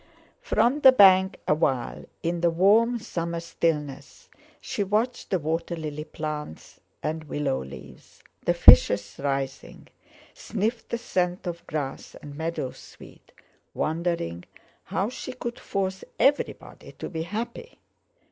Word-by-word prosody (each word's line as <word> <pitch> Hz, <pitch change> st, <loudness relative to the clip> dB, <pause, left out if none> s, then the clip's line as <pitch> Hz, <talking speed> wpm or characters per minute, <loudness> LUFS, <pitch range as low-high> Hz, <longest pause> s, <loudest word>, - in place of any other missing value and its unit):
From 285 Hz, -, +2 dB
the 265 Hz, -3 st, +9 dB
bank, 190 Hz, -5 st, +6 dB
awhile, 135 Hz, -6 st, 0 dB, 0.2 s
in 170 Hz, 0 st, -1 dB
the 170 Hz, -, +4 dB
warm 210 Hz, +8 st, +4 dB
summer 170 Hz, -6 st, -4 dB
stillness, 155 Hz, -4 st, -3 dB, 0.3 s
she 205 Hz, -, -2 dB
watched 215 Hz, +5 st, -1 dB
the 190 Hz, -, +2 dB
water 165 Hz, +2 st, -2 dB
lily 150 Hz, -2 st, -5 dB
plants 150 Hz, -, -6 dB, 0.2 s
and 155 Hz, +1 st, -3 dB
willow 140 Hz, -, -2 dB
leaves, 65 Hz, -1 st, -13 dB, 0.2 s
the -, -, +2 dB
fishes 100 Hz, 0 st, +7 dB
rising; 135 Hz, -1 st, -4 dB, 0.4 s
sniffed 225 Hz, +3 st, -3 dB
the 235 Hz, -, -1 dB
scent 180 Hz, -6 st, -1 dB
of 170 Hz, -1 st, -6 dB
grass 145 Hz, -3 st, -5 dB
and 145 Hz, -, -10 dB
meadow 160 Hz, -4 st, -3 dB
sweet, -, -, -15 dB, 0.4 s
wondering 160 Hz, -, -2 dB, 0.4 s
how 190 Hz, +4 st, -1 dB
she 255 Hz, -, -7 dB
could 240 Hz, -1 st, -6 dB
force 190 Hz, -1 st, -3 dB
everybody 285 Hz, +1 st, 0 dB
to -, -, -7 dB
be 160 Hz, -2 st, -4 dB
happy. 230 Hz, -, -5 dB
170 Hz, 125 wpm, -26 LUFS, 150-205 Hz, 0.4 s, the